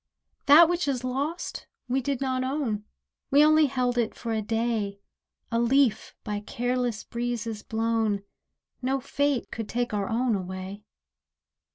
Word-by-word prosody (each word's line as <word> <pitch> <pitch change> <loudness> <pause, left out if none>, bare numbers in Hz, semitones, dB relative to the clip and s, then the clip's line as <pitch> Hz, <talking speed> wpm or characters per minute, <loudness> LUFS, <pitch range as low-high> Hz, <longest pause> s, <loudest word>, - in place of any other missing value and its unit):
That 310 +4 +9
which 350 -2 0
is 260 -3 -1
lost 280 +7 -3 0.2
we 260 +2 +1
did 275 0 -2
not 260 -1 0
own; 255 -6 -2 0.4
We 290 +2 +6
only 310 0 +5
held 250 -2 0
it 230 - 0
for 230 -1 -4
a 220 - 0
day— 220 -2 -1 0.5
A 230 - +1
leaf 250 0 +2
by 210 -1 -3
careless 245 +1 -2
breezes 235 -2 -3
blown; 220 -2 0 0.6
No 265 +1 0
fate 280 -1 -1
could 225 -2 -5
take 245 -1 -1
our 200 -2 -1
own 235 +1 +1
away. 185 +1 -5
240 Hz, 145 wpm, -27 LUFS, 220-270 Hz, 0.6 s, That